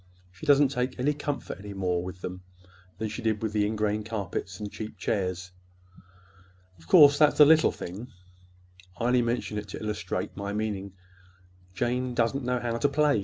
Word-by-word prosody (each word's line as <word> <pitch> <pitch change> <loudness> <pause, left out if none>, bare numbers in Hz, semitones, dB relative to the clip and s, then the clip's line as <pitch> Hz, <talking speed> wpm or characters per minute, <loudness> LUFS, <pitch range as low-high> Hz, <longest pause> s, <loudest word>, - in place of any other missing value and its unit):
She 125 +12 -11
doesn't 145 -1 +6
take 125 -1 -2
any 135 +4 +1
more - - -5
comfort 145 -8 -4
with 90 -3 -3
them 90 0 -6 0.6
than 110 +2 -2
she 105 +3 -6
did 110 -1 -1
with 110 -1 -2
the 105 -1 +2
ingrain 105 0 -1
carpets 100 -3 -4
and 105 -1 -5
cheap 110 -1 -7
chairs. 95 -2 -2 1.3
Of 80 - -19
course, 145 -4 +7
that's 150 -1 +4
a 150 - +10
little 160 +1 +5
thing. 100 +8 -7 0.9
I - - -4
only 125 0 +4
mentioned 115 -3 -2
it 105 - -8
to - - -6
illustrate 105 -1 -3
my 100 +1 -4
meaning. 100 -2 -3 0.8
Jane 125 +3 -1
doesn't 120 +3 +1
know 125 0 0
how 120 -1 -2
to 145 - +2
play. 145 -3 +2
110 Hz, 170 wpm, -27 LUFS, 100-125 Hz, 1.3 s, a